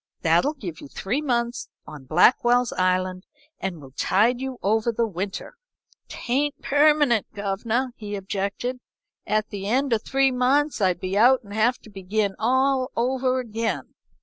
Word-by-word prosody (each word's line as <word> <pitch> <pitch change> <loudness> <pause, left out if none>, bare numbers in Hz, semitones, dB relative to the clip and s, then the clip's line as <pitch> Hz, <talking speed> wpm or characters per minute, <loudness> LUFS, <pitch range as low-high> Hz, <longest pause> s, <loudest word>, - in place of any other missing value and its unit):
'That'll 175 - +3
give 180 - -7
you - - -9
three 225 - -3
months 240 -3 -1 0.2
on 150 -3 -11
Blackwell's 245 - +3
Island 185 0 0 0.4
and 185 -4 -4
will 135 -2 -13
tide 225 - +2
you 265 -1 -4
over 220 +3 +2
the 230 +1 0
winter.' 195 - -5 0.5
"'Tain't 280 +4 -2
permanent, 290 -5 +3
governor,' 220 +5 -2
he 210 -2 -6
objected. 200 +6 -3 0.5
'At 215 0 0
the 200 -1 -5
end 260 +3 +1
o' 225 - +2
three 270 +3 +1
months 265 +2 +1
I'd 185 -2 +2
be 185 +1 -3
out 245 +5 +5
and 200 -1 -11
have 225 +4 +2
to 215 - -14
begin 200 +1 -2
all 260 +3 +2
over 255 +1 +1
again. 230 -2 -3
230 Hz, 150 wpm, -24 LUFS, 195-255 Hz, 0.5 s, out